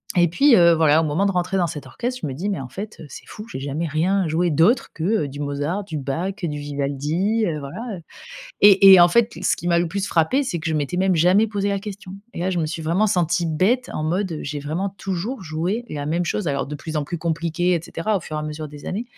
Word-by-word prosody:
Et 175 -1 +5
puis, 265 - +4
heu, 170 -3 +6
voilà 160 -1 +4
au - - -1
moment 155 +6 0
de 200 - +2
rentrer 180 +1 -1
dans 180 - +2
cet 155 -4 -6
orchestre, 250 +1 -4
je - - -2
me 135 - -4
dis: 180 +8 -4
«Mais 195 - -2
en 130 -2 -7
fait, 205 - -7
heu, 160 - -10
c'est - - -11
fou, 210 +1 -10
j'ai - - -5
jamais 145 +4 -3
rien 180 +5 +1
joué 165 +2 +1
d'autre 165 - +3
que, 160 - -6 0.2
heu, - - -3
du 140 +1 -9
Mozart, 145 +7 -2
du 160 -5 -5
Bach, 160 +8 -3
du 150 -3 -2
Vivaldi, 145 +9 -1
heu, 160 -3 -2
voilà, 140 +7 -8 0.2
heu». - - -11 0.6
Et 195 -1 +9
et 185 - +8
en 175 - +7
fait 235 +5 +3
ce - - +2
qui 175 - -4
m'a 170 - +3
le 170 0 0
plus 200 +3 -2
frappée, 175 - +2
c'est 200 -10 -3
que 160 0 -3
je 155 - -1
m'étais 150 +3 -2
même 190 0 +2
jamais 180 +7 +4
posé 205 -2 -2
la 200 - 0
question. 200 -2 -8 0.2
Et - - -8
là, 180 - 0
je 185 -2 -1
me 165 - 0
suis 160 +1 -5
vraiment 170 +7 +1
sentie 175 -2 +1
bête 195 +11 +1
en 155 - -3
mode, 175 0 -1
j'ai 145 +1 -4
vraiment 155 +7 -3
toujours 195 +6 -4
joué 175 +8 -2
la 145 -1 -4
même 170 +3 0
chose, 175 +1 -2
alors 140 -1 -1
de 150 +1 -6
plus 155 +1 -6
en 150 - -1
plus 170 +3 -5
compliquée, 170 +2 -1
et 165 - -2
cetera 185 +5 -2
au - - -2
fur 155 -1 -7
et - - -2
à - - -5
mesure 150 0 -5
des 145 0 -12
années. 215 +5 -3
170 Hz, 270 wpm, -22 LUFS, 155-195 Hz, 0.6 s, Et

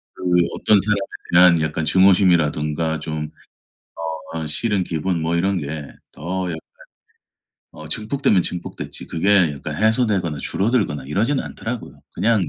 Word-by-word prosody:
그 - - -10 0.3
어떤 105 - +4
사람에 105 0 +1 0.3
대한 90 -2 +7
약간 80 0 -1
증오심이라든가 80 -4 +3
좀 75 -1 -5 1.0
어 80 -1 -3
싫은 95 +6 -1
기분 85 +1 -2
뭐 80 +1 0
이런 95 +3 +1
게 75 -1 -5 0.2
더 90 +4 -4
약간 80 -1 -4 1.1
어 75 0 -11
증폭되면 110 - +1
증폭됐지 90 0 -5
그게 95 -1 +3
약간 75 +2 -6
해소되거나 105 - +1
줄어들거나 95 - 0
이러지는 110 - 0
않더라고요. 120 +1 -7
그냥 110 -6 +1
90 Hz, 310 characters per minute, -21 LUFS, 80-100 Hz, 1.1 s, 대한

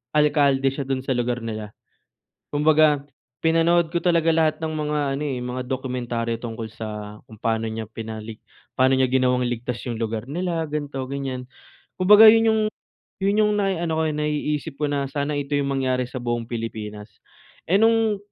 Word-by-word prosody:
alkalde 145 -3 +3
siya 135 0 -4
dun 135 -1 -1
sa 130 - -3
lugar 120 0 -1
nila. 110 -2 -6 0.8
Kumbaga, 150 -1 +3 0.4
pinanood 165 +1 +3
ko 170 - 0
talaga 170 -2 +3
lahat 160 -1 +2
ng 160 - -2
mga 150 -1 -1
ano, 140 - -3
eh, 130 - -2
mga 125 +1 -3
dokumentaryo 120 -3 -3
tungkol 115 -2 -6
sa 105 -1 -7
kung 110 - -12
paano 115 +1 -1
niya 110 0 -4
pinalig 110 0 -8 0.3
paano 130 +1 +3
niya 130 - +3
ginawang 125 -1 +2
ligtas 120 0 -3
yung 120 -3 -4
lugar 110 0 -2
nila, 170 +3 -2
ganito 145 -3 -4
ganyan. 130 -1 -4 0.5
Kumbaga, 210 +4 +8
yun 225 +1 +6
yung 220 - +2 0.6
yun 200 +2 +2
yung 210 - +3
nai-ano 175 -5 0
ko, - - +2
eh, 155 - -2
naiisip 150 0 -2
ko 150 - +1
na 140 -1 -1
sana 145 +1 -2
ito 145 0 -4
yung 140 - -1
mangyari 130 -2 0
sa 130 - -7
buong 120 -1 -2
Pilipinas. 110 -3 -6 0.6
Eh, 180 - +3
nung 225 -2 +3
135 Hz, 170 wpm, -23 LUFS, 120-155 Hz, 0.8 s, Kumbaga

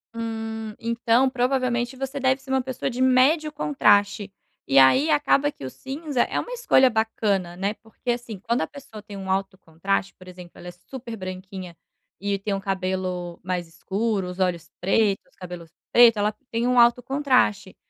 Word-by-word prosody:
Hum. 225 -1 -4
Então, 235 +2 +2
provavelmente 255 -1 0
você 270 +2 -4
deve 260 0 +1
ser 265 - -16
uma 265 0 +2
pessoa 260 +1 -3
de 250 0 -4
médio 265 +5 +4
contraste. 205 -9 +2 0.4
E 135 - +2
aí, 260 - +5
acaba 290 -1 +3
que - - -14
o - - -4
cinza 275 - -3
é - - -2
uma 485 - -6
escolha 475 - +4
bacana, 210 -5 -1
né? 200 +3 -1
Porque, 225 +3 -5
assim, 235 -3 -5
quando 235 +6 -1
a - - -1
pessoa 275 -7 -11
tem 205 -1 -11
um 190 -1 -4
alto 195 0 -1
contraste 190 +4 -2
por 185 - -16
exemplo 180 -1 -11
ela 180 - -11
é - - -6
super 230 +6 -9
branquinha 185 -2 -8 0.4
e 200 0 -1
tem 200 +1 -2
um 195 - -1
cabelo 185 -3 -3
mais 180 -2 -3
escuro, 195 +3 -2
os 180 +1 -8
olhos 180 -3 -1
pretos, 195 +2 +1
cabelos 175 -2 -9 0.2
preto, 235 -2 +7
ela 210 +1 +1 0.2
tem 230 +2 0
um 250 -1 +3
alto 240 +1 +5
contraste. 255 -8 +1
220 Hz, 180 wpm, -24 LUFS, 190-255 Hz, 0.4 s, preto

